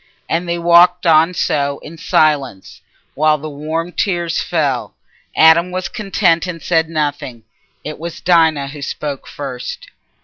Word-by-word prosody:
And 170 +1 -2
they 170 - -1
walked 175 +1 +4
on 165 +2 +4
so 140 -3 0
in 160 - -10
silence, 145 -11 0 0.3
while 155 +1 +2
the 155 +1 -7
warm 160 +4 -4
tears 175 -3 -1
fell. 145 -7 -2 0.4
Adam 160 +2 +5
was 185 0 -3
content, 190 -4 0
and 175 -2 -5
said 160 +1 0
nothing. 145 -7 -3 0.4
It 155 0 -7
was 170 +1 -7
Dinah 160 -5 +2
who 145 0 -10
spoke 140 0 -5
first. - - -7
160 Hz, 140 wpm, -17 LUFS, 150-175 Hz, 0.4 s, Adam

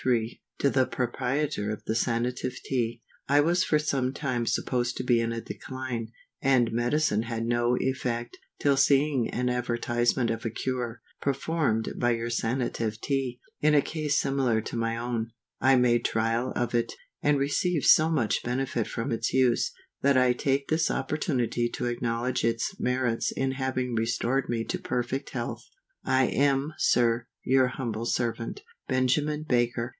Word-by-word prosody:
To 140 - +2
the 130 -1 +3
Proprietor 130 -1 -1
of 105 - -4
the - - 0
Sanative 120 +2 -1
TEA. 120 -3 -2 0.3
I 145 +1 +5
was 170 +4 +3
for 155 - +2
some 135 -4 0
time 125 -6 -2
supposed 125 -1 0
to - - -2
be 120 -2 +3
in 115 0 -1
a 115 0 -3
decline, 130 -3 -5 0.3
and 130 -4 +3
medicine 120 0 +1
had 115 0 -3
no 120 +1 +2
effect, 120 -3 -2 0.2
till 140 -1 +2
seeing 140 -2 +3
an 125 +1 -1
advertisement 120 0 0
of 115 0 -4
a 115 - -1
cure, 120 0 -3 0.2
performed 140 -5 0
by 120 0 +3
your 115 0 -3
Sanative 115 -2 -1
Tea, 135 -2 -2 0.2
in 150 0 +4
a 145 - +6
case 150 -2 0
similar 135 -5 +1
to 110 - -6
my 115 0 -1
own, 115 -1 -2 0.3
I 130 +1 +5
made 120 -1 +3
trial 115 +3 0
of 120 0 -1
it, 120 -1 0 0.3
and 145 -1 +3
received 145 +3 0
so 155 +1 +6
much 130 -10 +1
benefit 125 -2 -1
from 115 - -3
its 115 0 -1
use, 130 -2 +2 0.3
that 140 -1 +4
I 125 -1 +4
take 135 +2 0
this 160 +1 +2
opportunity 125 -4 -1
to - - -4
acknowledge 120 +1 -1
its 115 +9 0
merit 125 -2 0
in 135 0 +1
having 130 -2 -2
restored 115 +3 0
me 115 -1 0
to - - -3
perfect 125 +3 -2
health. - - -4 0.4
I 130 0 +3
am, 140 +3 +1
SIR, 120 -1 +2 0.2
your 130 0 +4
humble 115 -3 -3
servant, 120 - -2 0.3
BENJAMIN 145 +4 +1
BAKER. 120 -2 +1
125 Hz, 160 wpm, -27 LUFS, 115-135 Hz, 0.4 s, a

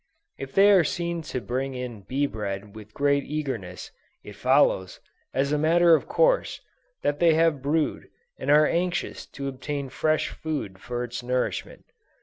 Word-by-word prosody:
If 135 0 -7
they 200 +1 +6
are 190 -4 +6
seen 170 +2 -2
to 125 - -2
bring 130 +2 -3
in 125 -4 -6
bee 135 +8 -1
bread 100 -4 -5
with 110 -1 -11
great 140 +2 +1
eagerness, 130 -13 -5 0.3
it 105 - -10
follows, 125 -6 +2 0.3
as 135 +2 0
a 150 - +1
matter 170 +2 +5
of 160 - +2
course, - - +2 0.4
that 145 0 0
they 165 -2 +5
have 160 -4 +2
brood, 150 +3 -1 0.3
and - - -4
are 150 +1 +6
anxious 180 +3 -1
to 140 0 -6
obtain 140 +1 -4
fresh 155 +4 0
food 140 -12 -5
for 120 +4 -4
its 120 0 -5
nourishment. 125 +1 -3
140 Hz, 160 wpm, -25 LUFS, 125-160 Hz, 0.4 s, they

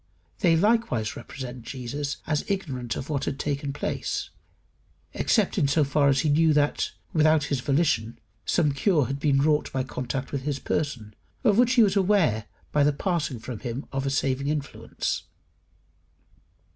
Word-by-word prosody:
They 170 -3 +4
likewise 170 - +1
represent 125 0 -7
Jesus 140 +4 -4
as 150 -1 0
ignorant 135 -12 -2
of 130 - -5
what 140 -3 -1
had 135 - -2
taken 140 -1 -2
place, 145 - -3 0.8
except - - +1
in 140 - +3
so 150 +2 +3
far 140 +1 +2
as 135 0 +3
he 155 - +1
knew 160 +2 +4
that, 145 0 +1 0.2
without 155 -1 +4
his 140 -2 -1
volition, 125 -5 +1 0.3
some 155 -4 +2
cure 150 0 +2
had 135 +2 -3
been 140 -2 +2
wrought 150 0 +2
by 130 -1 -1
contact 130 +1 -4
with 140 - -2
his 140 0 -2
person, 125 -9 -3 0.3
of 215 -3 +4
which 245 0 +4
he 240 -2 +6
was 200 -2 +2
aware 180 - +2 0.2
by 150 - +3
the 145 - +4
passing 155 -4 -1
from 115 0 -7
him 125 +2 -5
of 135 0 -2
a - - +2
saving 135 0 0
influence. 145 -1 -3
140 Hz, 165 wpm, -26 LUFS, 130-155 Hz, 0.8 s, he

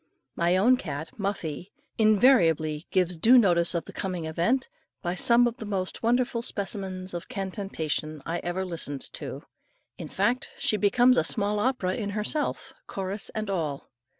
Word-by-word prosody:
My 175 +2 +2
own 245 +7 +5
cat, 155 - -5
Muffie, 190 -3 -3 0.3
invariably 175 - +4
gives 180 -2 +1
due 235 +10 +7
notice 175 -6 +3
of 170 - -1
the - - -11
coming 180 -4 -3
event, 170 +12 0 0.4
by 175 -1 -1
some 235 +6 +4
of 240 0 -1
the 220 - -7
most 190 -3 -3
wonderful 240 0 +1
specimens 190 -4 -4
of 175 +5 -6
cantation 190 -8 -3
I 170 +1 -2
ever 175 +2 -3
listened 160 -6 -4
to. - - -6 0.6
In - - -5
fact 250 +1 0
she - - +1
becomes 240 +5 +4
a - - +4
small 210 -1 0
opera 210 -6 0
in 205 -1 -3
herself, 290 +8 -2
chorus 195 +1 -3
and 215 -1 -2
all. 160 -8 -3
190 Hz, 155 wpm, -27 LUFS, 170-220 Hz, 0.6 s, due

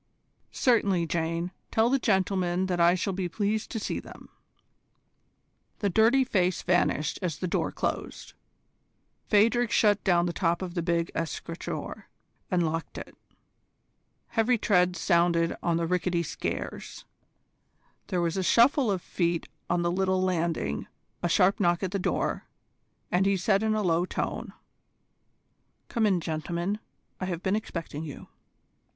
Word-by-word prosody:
"Certainly, 200 -8 +2
Jane. 165 +1 -2 0.2
Tell 225 +1 +3
the 275 - +3
gentlemen 190 -4 +1
that 180 -2 -1
I 170 +1 +5
shall 190 +2 -2
be 180 -1 -2
pleased 210 +4 -1
to 225 - -3
see - - -3
them." - - -13 1.5
The 200 -2 0
dirty 230 +7 +4
face 185 -7 0
vanished 175 -4 +1
as 170 -5 -2
the 185 - -3
door - - -1
closed. - - -4 1.0
Phadrig 230 +3 +4
shut 210 -2 +3
down 175 -3 +3
the 175 - -2
top 170 0 0
of 180 -2 -5
the 175 - -1
big 170 0 0
escritoire 165 +1 -5 0.4
and 175 -2 +2
locked 165 +1 -3
it. - - -9 1.1
Heavy 235 +2 +2
treads 180 -4 +2
sounded 170 -2 +2
on 170 -1 +1
the 170 - 0
rickety 180 0 0
stairs. 155 - -5 1.0
There 180 -3 0
was 170 +1 -1
a - - +1
shuffle 240 - +4
of 190 -3 -1
feet 170 -2 -1 0.2
on 175 0 +1
the 170 - +1
little 190 0 +1
landing, 170 - -1 0.3
a 175 - 0
sharp 185 +3 +3
knock 175 -2 +2
at 185 - -1
the 200 - -1
door, - - -1 0.6
and 185 +2 +3
he 200 -1 +2
said 195 +2 +2
in 220 0 +1
a 215 - 0
low 175 -1 +2
tone: - - -4 1.4
"Come 225 -3 +2
in, 185 -4 +2
gentlemen. 170 +5 -2 0.4
I 185 - -2
have 180 -2 -4
been 190 +2 +1
expecting 165 -7 -5
you." 145 -4 -9
180 Hz, 145 wpm, -28 LUFS, 170-200 Hz, 1.5 s, I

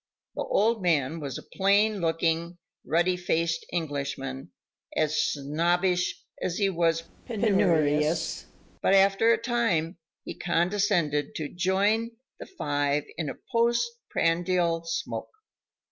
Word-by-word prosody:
The - - -4
old 230 - +1
man 160 -3 +1
was 140 -4 -5
a - - -9
plain 205 +2 +2
looking 165 +1 0 0.3
ruddy 175 +3 +2
faced 165 -2 -1
Englishman, 140 - -4 0.5
as 155 -1 +2
snobbish 175 +5 0 0.2
as 175 - -2
he 200 -2 +2
was 165 -2 +1 0.2
penurious, 165 - +1 0.3
but 195 - +4
after 195 +3 +5
a 230 - +4
time 225 -9 0 0.2
he - - -6
condescended 175 -4 0
to 150 -2 -3
"join" 205 +6 0 0.2
the - - -8
five 145 - -1
in 160 -4 -3
a - - -5 0.2
post 235 0 +2 0.2
prandial 170 0 +1
smoke. 165 - -4
170 Hz, 115 wpm, -27 LUFS, 155-200 Hz, 0.5 s, after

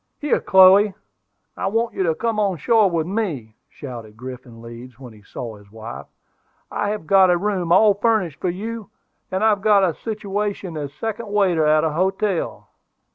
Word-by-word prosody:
"Here, 295 - 0
Chloe, 190 +1 +6 0.6
I - - -3
want 225 +3 -1
you - - -3
to 165 -4 +1
come 225 +1 -2
on 195 -4 0
shore 220 +3 +3
with 165 -3 -1
me," 165 - -4
shouted 115 -6 -10
Griffin 125 -1 -10
Leeds, 120 +1 -11
when 125 -4 -11
he 105 - -17
saw 110 +1 -8
his 100 -1 -19
wife. 115 +2 -9 0.6
"I 205 - -2
have 210 -5 -4
got 190 +2 +5
a 175 - +3
room 185 -3 -2
all 205 +3 +6
furnished 205 -6 0
for 185 - 0
you, 215 +3 -6 0.4
and 190 +2 -2
I've 210 -2 +3
got 205 -1 +4
a 170 - -1
situation 205 -3 -4
as 145 -2 -5
second 225 +8 -5
waiter 190 -6 +2
at 155 0 +3
a 160 - 0
hotel." 190 +3 -2
185 Hz, 180 wpm, -21 LUFS, 145-210 Hz, 0.6 s, Chloe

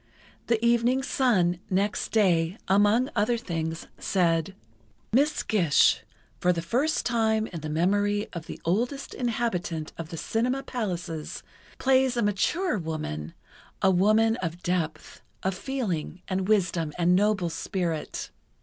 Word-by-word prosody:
The 230 0 +1
evening 240 +3 +3
Sun 205 - +2
next 200 +2 0
day, 180 -4 +2
among 210 +7 +3
other 230 +2 +2
things, 165 -6 -4
said: 170 -1 +1 0.6
Miss 290 +5 +3
Gish, 175 -9 +3 0.4
for 180 - +3
the 170 -2 -2
first 270 - 0
time 220 -2 +2
in 175 -6 -6
the 155 - -5
memory 205 +6 +1
of 170 -3 -6
the - - -7
oldest 240 - -1
inhabitant 205 -10 -2
of 165 -1 -5
the 165 - -6
cinema 250 - -1
palaces, 175 - -4 0.3
plays 260 -1 +3
a 235 - +2
mature 210 - +1
woman, 150 - -5 0.5
a 190 - +6
woman 215 +5 +3
of 175 -2 -5
depth, 175 -3 -2 0.2
of 190 - +1
feeling 185 - -3
and 190 0 -1
wisdom 175 -7 +1
and 175 +1 +3
noble 195 -3 +2
spirit.... 165 -1 -3
195 Hz, 130 wpm, -27 LUFS, 170-235 Hz, 0.6 s, a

